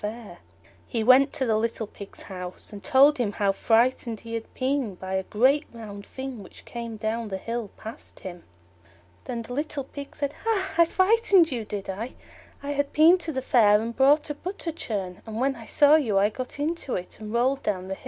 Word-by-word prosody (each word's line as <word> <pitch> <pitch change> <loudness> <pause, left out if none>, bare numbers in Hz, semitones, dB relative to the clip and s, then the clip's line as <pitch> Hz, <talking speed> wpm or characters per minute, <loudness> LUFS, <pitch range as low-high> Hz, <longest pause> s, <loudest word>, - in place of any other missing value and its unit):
He 230 -3 -1
went 260 +4 +6
to 275 -4 0
the 225 -3 +2
little 230 0 -1
Pig's 200 -1 -11
house, 180 +2 -6
and 200 - -9
told 285 0 +5
him 210 -4 0
how 200 -2 +2
frightened 230 +2 +1
he 230 0 -8
had 230 -1 -5
been 260 -6 -1
by 190 +1 -6
a 190 - +1
great 260 +10 +2
round 205 -3 -9
thing 265 -4 -6
which - - -14
came 235 -2 -6
down 220 +1 -2
the 190 -2 -4
hill 230 +1 -4
past 220 +2 -9
him. 175 -2 -8 0.8
Then 235 -2 -4
the 245 - -8
little 290 0 -2
Pig 280 +1 -9
said, 285 0 -2
"Hah! 420 -4 0
I 335 0 +6
frightened 375 -2 +4
you, 235 -4 -3
did 205 -2 -5
I? 215 +6 -5 0.5
I 285 - -3
had 285 0 -1
been 330 +4 +6
to 330 -2 -4
the 260 -3 -3
Fair 210 -5 +5
and 230 +1 -4
bought 290 +3 +4
a - - -1
butter 350 +2 -5
churn, 195 - -5
and 220 0 -5
when 270 +2 +1
I 230 -2 -11
saw 290 +5 +5
you 225 -10 +1
I 200 +1 +4
got 255 +5 -7
into 305 -2 -2
it, 180 - -6
and 215 -1 -7
rolled 255 +4 +1
down 185 -3 -2
the 190 - -3
hill." - - -9
235 Hz, 210 wpm, -26 LUFS, 210-285 Hz, 0.8 s, went